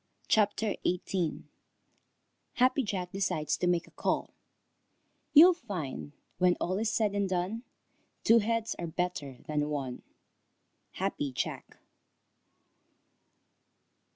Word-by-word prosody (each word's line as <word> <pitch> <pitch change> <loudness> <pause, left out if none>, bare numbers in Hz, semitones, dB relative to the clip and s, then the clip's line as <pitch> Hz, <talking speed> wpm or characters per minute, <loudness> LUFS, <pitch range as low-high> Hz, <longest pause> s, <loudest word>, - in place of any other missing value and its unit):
CHAPTER 210 0 +2
XVIII 180 -1 -1 1.1
HAPPY 255 +3 +3
JACK 185 -3 -3
DECIDES 160 -6 0
TO 180 - -1
MAKE 175 -1 +2
A - - -19
CALL - - -1 1.0
You'll 340 +5 +9
find 180 - -6 0.3
when 180 -1 +4
all 185 +3 -1
is 220 0 +1
said 215 -3 +1
and 200 -1 0
done 185 +5 -1 0.6
Two 230 +1 +6
heads 230 +1 -1
are 170 - -3
better 160 -5 -3
far - - -21
than 150 0 +1
one. 135 -4 -3 1.0
_Happy 185 -7 -1
Jack. 125 - -4
185 Hz, 110 wpm, -30 LUFS, 160-215 Hz, 1.1 s, You'll